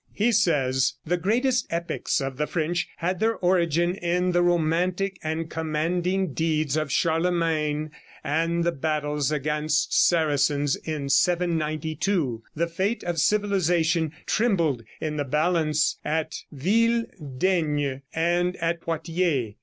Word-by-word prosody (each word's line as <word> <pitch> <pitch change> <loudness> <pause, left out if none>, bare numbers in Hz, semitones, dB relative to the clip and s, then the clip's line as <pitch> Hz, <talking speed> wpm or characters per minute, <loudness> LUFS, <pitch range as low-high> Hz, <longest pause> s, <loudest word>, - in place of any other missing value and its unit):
He 225 +4 +2
says: 135 - +2
"The 175 +3 +1
great 215 +9 0 0.2
epics 170 -2 -1
of 135 -1 -4
the 150 +1 -1
French 170 +1 -1
had 180 +2 -2
their 225 +1 +2
origin 175 -2 +2
in 180 0 0
the 175 0 +2
romantic 175 +3 +1
and 160 +1 -2
commanding 165 +3 -1
deeds 155 -3 0
of 155 -3 -1
Charlemagne 160 -2 0 0.3
and 165 +3 0
the 170 - +2
battles 150 -2 -1
against 150 +1 0
Saracens 145 -3 +2
in 150 -3 -5
792. 160 - 0
The 170 +2 0
fate 190 +7 -2
of 175 -2 -2
civilization 175 -5 +2
trembled 170 - +1 0.2
in 155 -1 -3
the 145 - 0
balance 155 +1 +1
at 155 +1 -1 0.2
Ville 230 - +2 0.3
Daigne 150 -6 0
and 175 +2 +1
at 170 0 -2
Poitiers. 165 - -1
165 Hz, 120 wpm, -25 LUFS, 150-175 Hz, 0.3 s, He